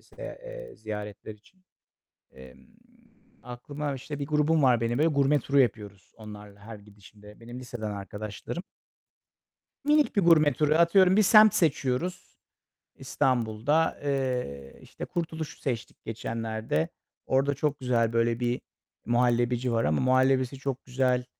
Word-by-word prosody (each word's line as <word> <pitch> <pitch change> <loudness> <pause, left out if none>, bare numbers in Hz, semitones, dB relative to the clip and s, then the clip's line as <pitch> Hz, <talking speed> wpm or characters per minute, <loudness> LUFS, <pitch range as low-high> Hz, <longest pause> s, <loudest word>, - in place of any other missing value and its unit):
ze - - -24 0.3
eee, - - -10
ziyaretler 105 0 -7
için. 185 - -26 0.7
Emm, 65 -1 -15 0.8
aklıma, 140 +4 -5
işte, 140 +2 -7
bir 140 - -4
grubum 150 +1 +2
var 125 -3 +4
benim, 115 +2 -1
böyle 160 - +4
gurme 140 -1 +2
turu 140 +3 +2
yapıyoruz 105 -5 -2
onlarla 105 -2 -11
her 110 +1 -10
gidişimde. 105 +1 -17
Benim 120 +2 -9
liseden 120 -4 -6
arkadaşlarım. 105 - -6 1.2
Minik 300 -4 +2
bir 200 - +4
gurme 155 -4 +5
turu. 150 +3 +1
Atıyorum, 180 +3 +5
bir 215 - +5
semt 215 +1 +7
seçiyoruz 155 +2 0 0.7
İstanbul'da. 130 +6 0
Eee, 125 - -3
işte - - -8
Kurtuluş'u 160 -3 -5
seçtik 120 -5 -5
geçenlerde. 110 -6 -3 0.4
Orada 135 +2 +1
çok 150 -1 -2
güzel 115 -3 +1
böyle 115 +1 +1
bir 120 0 -1 0.5
muhallebici 120 +1 +1
var 115 0 +1
ama 75 0 +1
muhallebisi 130 0 +2
çok 135 -1 -4
güzel, 125 -1 0
125 Hz, 130 wpm, -27 LUFS, 110-150 Hz, 1.2 s, semt